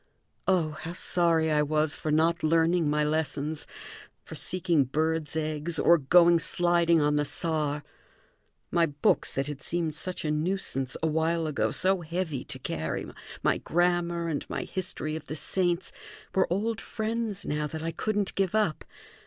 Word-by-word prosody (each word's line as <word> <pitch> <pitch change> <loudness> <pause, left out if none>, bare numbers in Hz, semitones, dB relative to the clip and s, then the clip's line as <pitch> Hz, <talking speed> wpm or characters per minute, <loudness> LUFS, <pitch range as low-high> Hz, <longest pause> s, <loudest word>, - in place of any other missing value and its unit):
Oh, 175 -5 +2
how 160 +2 -7
sorry 170 -3 +2
I 150 -1 +3
was 150 0 +1
for 155 - -4
not 165 +3 +2
learning 165 0 +3
my 150 0 +2
lessons, 150 0 -1 0.6
for - - -10
seeking 175 -6 +1
birds' 155 +2 -1
eggs, 155 +1 -2
or 170 +2 +5
going 170 +4 +5
sliding 170 0 +3
on 150 0 +2
the 150 - +2
Saar! 150 -1 -1 0.9
My 170 -1 +3
books, 145 -1 +1
that 135 - -1
had 145 -1 -6
seemed 165 +1 -1
such 180 +3 -4
a 150 - +1
nuisance 150 -5 -2
a - - +3
while 160 +1 +1
ago, 135 -8 0
so 185 - +2
heavy 165 -5 -3
to - - -6
carry, 80 -10 -3 0.4
my - - +2
grammar, 175 0 +1
and 155 -3 -2
my - - -3
history 175 -4 -2
of 160 - -7
the 155 - -4
saints, 175 +2 -1 0.4
were 190 -2 +2
old 220 +4 -1
friends 220 -2 -3
now 150 0 -1
that 160 +2 -6
I 165 - -2
couldn't 205 +3 -1
give 195 0 0
up. 210 -8 +1
160 Hz, 160 wpm, -28 LUFS, 150-175 Hz, 0.9 s, or